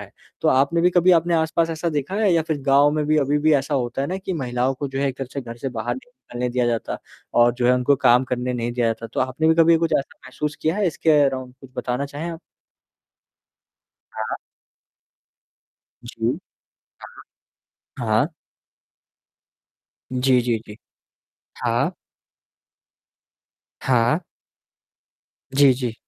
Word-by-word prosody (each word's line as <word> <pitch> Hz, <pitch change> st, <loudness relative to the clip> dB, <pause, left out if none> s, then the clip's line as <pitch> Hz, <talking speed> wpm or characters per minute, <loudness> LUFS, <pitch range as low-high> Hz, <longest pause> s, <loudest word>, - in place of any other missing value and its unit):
है। -, -, -10 dB, 0.3 s
तो -, -, +2 dB
आपने 140 Hz, +6 st, +3 dB
भी 175 Hz, +1 st, +4 dB
कभी 180 Hz, +1 st, +4 dB
आपने 170 Hz, +1 st, -1 dB
आस-पास 165 Hz, +1 st, +1 dB
ऐसा 165 Hz, +1 st, -2 dB
देखा 150 Hz, +4 st, -3 dB
है? 205 Hz, -3 st, +2 dB
या 165 Hz, -1 st, +3 dB
फिर 155 Hz, -2 st, -2 dB
गाँव 140 Hz, +1 st, +5 dB
में 155 Hz, -1 st, 0 dB
भी 155 Hz, 0 st, +2 dB
अभी 145 Hz, +1 st, +1 dB
भी 155 Hz, +1 st, +3 dB
ऐसा 140 Hz, +1 st, 0 dB
होता 125 Hz, 0 st, -1 dB
है -, -, -1 dB
ना 185 Hz, -, -2 dB
कि 190 Hz, 0 st, -4 dB
महिलाओं 130 Hz, -4 st, -1 dB
को 140 Hz, +1 st, -4 dB
जो 135 Hz, 0 st, -5 dB
है 140 Hz, -, +1 dB
एक 130 Hz, -, -5 dB
तरह 135 Hz, -2 st, -4 dB
से 140 Hz, -, -3 dB
घर 115 Hz, -2 st, -8 dB
से 135 Hz, -, -4 dB
बाहर 120 Hz, -1 st, -3 dB
नहीं 130 Hz, -, -12 dB
निकलने 125 Hz, -, -5 dB
दिया 125 Hz, 0 st, 0 dB
जाता 115 Hz, -1 st, -2 dB, 0.4 s
और 120 Hz, 0 st, +5 dB
जो 120 Hz, 0 st, 0 dB
है 125 Hz, -, +5 dB
उनको 125 Hz, +3 st, +2 dB
काम 125 Hz, +1 st, +4 dB
करने 125 Hz, 0 st, -2 dB
नहीं 120 Hz, -1 st, -2 dB
दिया 120 Hz, -1 st, 0 dB
जाता। 115 Hz, 0 st, -2 dB
तो -, -, -1 dB
आपने 130 Hz, +5 st, 0 dB
भी 160 Hz, -, +5 dB
कभी 165 Hz, 0 st, +5 dB
कुछ 165 Hz, -1 st, -1 dB
ऐसा 135 Hz, -, -7 dB
महसूस 145 Hz, +3 st, -4 dB
किया 160 Hz, +5 st, +1 dB
है 210 Hz, -, +1 dB
इसके 160 Hz, -1 st, 0 dB
अराउंड 130 Hz, -2 st, 0 dB
और -, -, -18 dB
कुछ 135 Hz, -2 st, -14 dB
बताना 125 Hz, +3 st, -2 dB
चाहें 150 Hz, +5 st, -5 dB
आप? 165 Hz, -, -7 dB, 1.8 s
हाँ। -, -, -3 dB, 1.7 s
जी। -, -, -2 dB, 1.4 s
हाँ। 120 Hz, -, -9 dB
हाँ। 110 Hz, +6 st, +3 dB, 1.9 s
जी, 130 Hz, 0 st, +3 dB
जी, 120 Hz, -2 st, 0 dB
जी। 105 Hz, -, -10 dB, 0.9 s
हाँ। -, -, +1 dB, 1.9 s
हाँ। 125 Hz, +5 st, +2 dB, 1.4 s
जी, 140 Hz, -1 st, +7 dB
जी। 125 Hz, -3 st, -3 dB
135 Hz, 165 wpm, -22 LUFS, 125-160 Hz, 1.9 s, जी